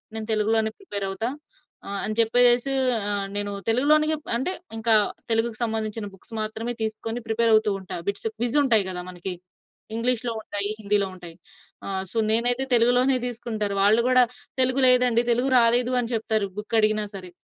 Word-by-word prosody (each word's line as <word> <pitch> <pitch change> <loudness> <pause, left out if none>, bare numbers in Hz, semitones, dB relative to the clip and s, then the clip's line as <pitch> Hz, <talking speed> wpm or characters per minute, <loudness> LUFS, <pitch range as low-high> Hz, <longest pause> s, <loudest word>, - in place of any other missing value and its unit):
నేను 220 -1 -5
తెలుగులోనే 220 +1 +1
ప్రిపేర్ 205 - -5
అవుతా. 195 +5 -3 0.6
ఆహ్, 200 0 -3
అని 215 +1 -4
చెప్పేసేసి 245 +3 +4 0.4
ఆహ్, 200 -1 -1
నేను 205 0 -2 0.2
తెలుగులోనే 295 +6 +3 0.3
అంటే 265 +9 -2 0.3
ఇంకా 225 0 +3 0.4
తెలుగుకు 225 0 0
సంబంధించిన 220 -1 -3
బుక్స్ 195 - -17
మాత్రమే 220 +2 -3
తీసుకొని 225 +2 -4
ప్రిపేర్ 225 +1 +1
అవుతూ 215 -1 +2
ఉంటా. 185 - -6
బిట్స్ 200 +2 -3
క్విజ్ 240 +4 -1
ఉంటాయి 225 -7 +3
గదా! 180 -1 -4
మనకి. 180 +1 -4 0.6
ఇంగ్లీష్‌లో 240 +1 0
ఉంటాయి. 205 -1 -1
హిందీలో 205 -2 0
ఉంటాయి. 175 -2 -11 0.5
ఆహ్, 190 -1 -3
సో, - - -6
నేనైతే 240 +3 +2
తెలుగులోనే 245 +3 +4
తీసుకుంటారు. 220 -4 -4
వాళ్ళు 215 +3 +4
కూడా, 255 0 +5 0.4
"తెలుగు 255 +1 +3
లేదండి. 250 -2 +5
తెలుగు 245 +3 +1
రాలేదు" 240 +1 +3
అని 240 0 -3
చెప్తారు 220 -2 0
బుక్ 210 +2 -4
అడిగినా 215 0 +2
సరే. 185 -2 -8
225 Hz, 155 wpm, -24 LUFS, 210-245 Hz, 0.6 s, కూడా